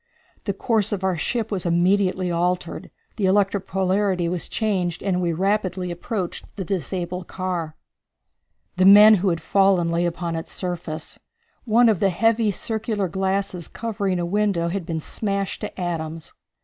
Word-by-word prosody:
The 200 - 0
course 220 -1 +1
of 195 -2 -2
our 190 -1 +1
ship 225 +7 -2
was 190 -4 -1
immediately 185 +1 +2
altered, 175 +1 -1 0.3
the 200 -4 +1
electric 195 0 +2
polarity 190 -1 +1
was 175 0 -3
changed, 185 -6 -1
and 185 -2 0
we 175 -1 +1
rapidly 185 0 -1
approached 180 +1 -4
the 190 - -4
disabled 180 -1 -3
car. 175 -4 -3 1.0
The 185 - +4
men 210 +2 +9
who 195 - +2
had 170 -2 -1
fallen 195 -3 +3
lay 170 +1 +1
upon 170 -1 -3
its 165 +1 -6
surface. 170 -4 -5 0.5
One 235 +1 +5
of 215 -6 +3
the 200 - +3
heavy 225 +3 +2
circular 215 0 -2
glasses 190 -1 -2
covering 205 -5 -2
a 175 - -1
window 190 -2 0
had 180 -1 -4
been 160 -3 -2
smashed 200 +2 -2
to - - -6
atoms. 165 -2 -4
185 Hz, 155 wpm, -23 LUFS, 175-200 Hz, 1.0 s, men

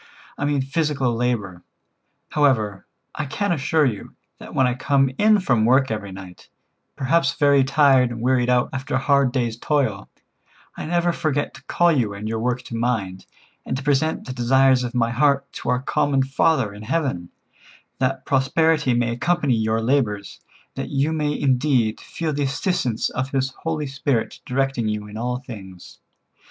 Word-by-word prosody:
I 145 - -3
mean 145 -2 +1
physical 135 -3 0
labor. 115 -7 -2 0.7
However, 115 -9 +1 0.3
I 150 - -4
can 200 +8 -2
assure 155 0 +2
you, 110 -7 -4 0.2
that - - -10
when 130 - +4
I 125 - +1
come 135 +1 +1
in 215 0 +5
from 120 - +1
work 130 +2 +3
every 105 -3 -4
night, 95 -2 -11 0.5
perhaps 140 +1 +1
very 140 -2 +4
tired 135 -2 +4
and 120 -1 -6
wearied 125 +1 +1
out 125 0 +2
after 130 +1 -3
a - - +3
hard 140 -1 +2
day's 120 -3 -1
toil, 120 -9 -1 0.7
I - - -6
never 175 +1 +1
forget 145 -3 -1
to - - -14
call 175 0 +3
you 115 -9 0
and 105 +2 -6
your 110 0 -2
work 125 +2 -1
to 120 - -7
mind, 110 -6 -2 0.4
and 130 - -3
to 135 - -6
present 145 +3 0
the 130 - -5
desires 130 +1 +3
of 120 0 -5
my 115 -1 +1
heart 140 +2 +1
to - - -5
our 125 +1 0
common 135 -1 +1
Father 135 -4 +1
in 105 - -11
heaven, 110 - -2 0.7
that 130 0 -1
prosperity 150 0 +2
may 120 -1 +1
accompany 145 +3 +1
your 110 0 0
labors, 115 -6 -1 0.4
and - - -3
that - - -10
you 140 +3 +1
may 150 -2 -1
indeed 130 -4 +1
feel 160 -2 -4
the 145 - -2
assistance 135 - -1
of 130 +1 -3
His 135 -1 -1
Holy 155 +2 -3
Spirit 135 -3 -2
directing 135 -3 0
you 105 -1 -3
in 105 - -11
all 125 +2 -2
things. 95 -8 -11
130 Hz, 175 wpm, -22 LUFS, 115-145 Hz, 0.7 s, in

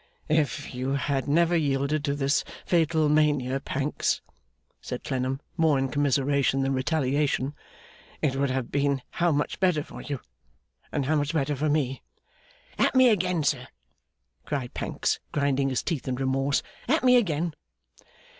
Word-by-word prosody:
'If 150 -2 0
you 130 +2 -2
had 140 -1 -1
never 170 +4 +3
yielded 145 -1 +1
to 140 - 0
this 140 0 +1 0.2
fatal 160 -2 +2
mania, 145 -3 +2
Pancks,' 140 +1 -1 0.6
said - - -6
Clennam, 130 +1 -2 0.2
more 160 -4 +4
in 135 0 0
commiseration 140 -1 +1
than 135 0 +1
retaliation, 140 0 0 0.7
'it 135 -3 0
would 140 0 +1
have 130 -2 -2
been 140 -2 +1 0.2
how 175 0 +4
much 145 0 -1
better 180 -6 +2
for - - -10
you, 140 -3 -4 0.7
and 140 - -1
how 155 +3 +2
much 145 +1 0
better 145 -1 +1
for 150 +3 0
me!' 140 -3 0 0.8
'At - - +3
me 260 -1 +7
again, 180 -6 +1
sir!' 135 -3 0 0.8
cried 135 -5 -3
Pancks, - - -1
grinding 140 -1 +1
his 130 - -1
teeth 155 -7 -3
in 130 - 0
remorse. 135 +2 0 0.2
'At 310 +4 +2
me 250 -1 +6
again! 170 -8 +1
145 Hz, 150 wpm, -26 LUFS, 135-155 Hz, 0.8 s, me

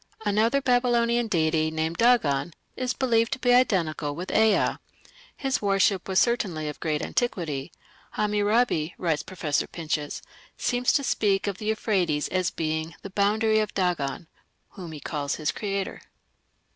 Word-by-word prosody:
Another 220 +6 +2
Babylonian 240 -2 +2
deity, 160 -4 +1
named 160 +1 -3
Dagan, 175 - +3 0.2
is 255 -1 -1
believed 230 -3 +1
to - - -3
be 245 -1 +3
identical 165 - +1
with 180 +4 -5
Ea. 220 -1 +3 0.6
His 270 -2 -1
worship 195 -2 +2
was 190 -1 -1
certainly 185 -11 +1
of 150 - -6
great 155 -2 -1
antiquity. 165 - -2 0.4
"Hammurabi", 210 -5 +1
writes 165 -4 0
Professor 165 -6 -2
Pinches, 155 -3 -4 0.3
"seems 245 0 +1
to 280 - +2
speak 200 -6 +1
of 200 -2 -3
the 215 - -5
Euphrates 185 -9 0
as 185 -1 0
being 160 0 -3
'the 195 - -7
boundary 215 +2 +2
of 215 - -2
Dagan'," 175 -5 -1 0.4
whom 180 -4 -9
he 155 - -8
calls 145 -1 -3
his 155 -2 -1
creator. 200 -2 -4
195 Hz, 145 wpm, -26 LUFS, 160-225 Hz, 0.6 s, Dagan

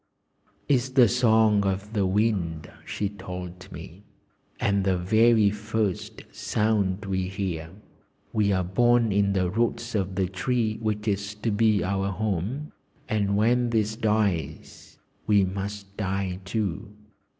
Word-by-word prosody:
"It's 130 -2 +2
the 130 -2 +5
song 110 -3 +4
of 100 +2 -2
the 100 -3 +1
wind," 95 -6 0 0.2
she 105 - -2
told 90 -2 -8
me, 90 +5 -10 0.6
"and 100 -1 +1
the 95 -1 +1
very 110 +3 +4
first 105 -2 -3
sound 105 -2 0
we 95 -1 -1
hear. 90 -5 -4 0.6
We 105 -2 +2
are 95 -1 +1
born 120 +5 +3
in 100 0 +2
the 95 -2 +1
roots 115 +2 -1
of 95 -3 -1
the 95 -1 +1
tree 110 +3 -1
which 105 -1 -2
is 100 0 -1
to 110 +2 -2
be 105 -2 +3
our 95 +1 -1
home, 105 - -2 0.4
and 100 -3 0
when 120 +3 +2
this 110 -1 0
dies, 105 - -2 0.3
we 100 -2 +4
must 100 +1 -5
die 95 -2 -2
too. 105 0 -3
100 Hz, 135 wpm, -26 LUFS, 95-110 Hz, 0.6 s, the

